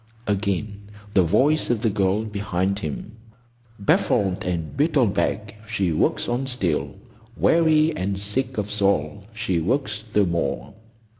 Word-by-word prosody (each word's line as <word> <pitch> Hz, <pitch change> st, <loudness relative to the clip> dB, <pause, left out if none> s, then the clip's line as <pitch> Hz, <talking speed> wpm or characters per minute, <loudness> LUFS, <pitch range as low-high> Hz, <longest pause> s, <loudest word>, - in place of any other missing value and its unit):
Again 100 Hz, 0 st, -2 dB, 0.2 s
the 95 Hz, -, +5 dB
voice 140 Hz, -, +2 dB
of 120 Hz, -3 st, 0 dB
the 115 Hz, -, +2 dB
girl 100 Hz, +1 st, +1 dB
behind 100 Hz, -2 st, -1 dB
him— 80 Hz, +5 st, -5 dB, 0.7 s
"Baffled 100 Hz, -1 st, +1 dB
and 85 Hz, -3 st, -3 dB
beaten 140 Hz, -, +2 dB
back, 100 Hz, +3 st, -1 dB, 0.2 s
she 100 Hz, -6 st, 0 dB
works 80 Hz, -, +1 dB
on 125 Hz, +3 st, -1 dB
still; 95 Hz, -, -1 dB, 0.4 s
Weary 160 Hz, -1 st, +4 dB
and 95 Hz, +1 st, -2 dB
sick 105 Hz, +7 st, -1 dB
of 105 Hz, -1 st, -2 dB
soul, 100 Hz, -3 st, 0 dB
she 100 Hz, -6 st, 0 dB
works 105 Hz, -, -1 dB
the 105 Hz, -2 st, +1 dB
more. 85 Hz, -1 st, -2 dB
100 Hz, 135 wpm, -23 LUFS, 95-115 Hz, 0.7 s, the